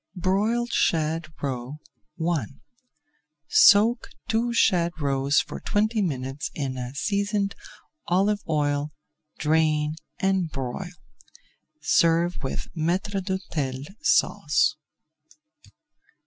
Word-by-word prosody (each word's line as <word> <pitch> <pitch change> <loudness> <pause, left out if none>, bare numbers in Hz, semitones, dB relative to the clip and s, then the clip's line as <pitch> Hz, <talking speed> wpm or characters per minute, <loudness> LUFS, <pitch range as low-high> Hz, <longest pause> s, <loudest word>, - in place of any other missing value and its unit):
BROILED 210 +6 0
SHAD 160 0 +1 0.2
ROE 130 +1 -3 0.6
I 140 -9 -2 1.0
Soak 225 +4 +5 0.2
two 230 +2 +1
shad 175 -7 +2
roes 140 -1 +2
for - - -8
twenty 215 +1 0
minutes 135 -4 -3
in 135 -3 -2 0.2
seasoned 200 +4 0 0.5
olive 200 +3 +2
oil, 145 -1 0 0.5
drain 155 -1 +2 0.2
and 190 -3 +1
broil. 135 +7 -5 0.9
Serve 170 +1 +2
with 135 - -4
Maître 185 +4 -1
d'Hôtel 145 -8 -3 0.2
Sauce. 155 -5 +2
170 Hz, 85 wpm, -25 LUFS, 145-200 Hz, 1.0 s, Soak